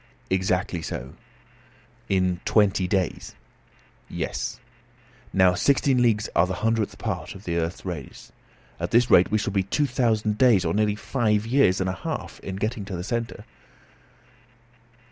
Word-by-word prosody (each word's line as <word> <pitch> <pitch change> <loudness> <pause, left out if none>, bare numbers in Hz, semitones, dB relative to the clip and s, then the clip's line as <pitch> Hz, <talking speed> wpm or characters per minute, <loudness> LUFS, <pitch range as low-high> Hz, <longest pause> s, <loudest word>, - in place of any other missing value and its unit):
"Exactly 95 -2 0
so." 65 -4 -6 1.0
"In 90 -2 +1
twenty 105 -3 +2
days?" 95 -3 -2 0.7
"Yes." - - -4 0.7
"Now, 95 -1 +4
sixteen 135 +4 +2
leagues 110 -3 +2
are 85 - +4
the 95 - -3
hundredth 115 -2 0
part - - -4
of 95 - -11
the 85 -4 -2
earth's 85 +3 -3
radius. 80 -8 -7 0.5
At 85 +1 -2
this 120 +3 +3
rate 90 - +6
we 110 - +2
shall 100 -1 -2
be 100 - +2
two 120 +10 0
thousand 110 -5 0
days, 115 -8 +5
or 80 - 0
nearly 105 0 +1
five 110 -2 0
years 115 -6 +3
and 95 - 0
a 95 - -1
half, 95 - -5
in 95 - -6
getting 105 +2 -2
to 100 -2 -5
the 85 - -4
centre." 115 +3 -4
100 Hz, 150 wpm, -25 LUFS, 90-110 Hz, 1.0 s, rate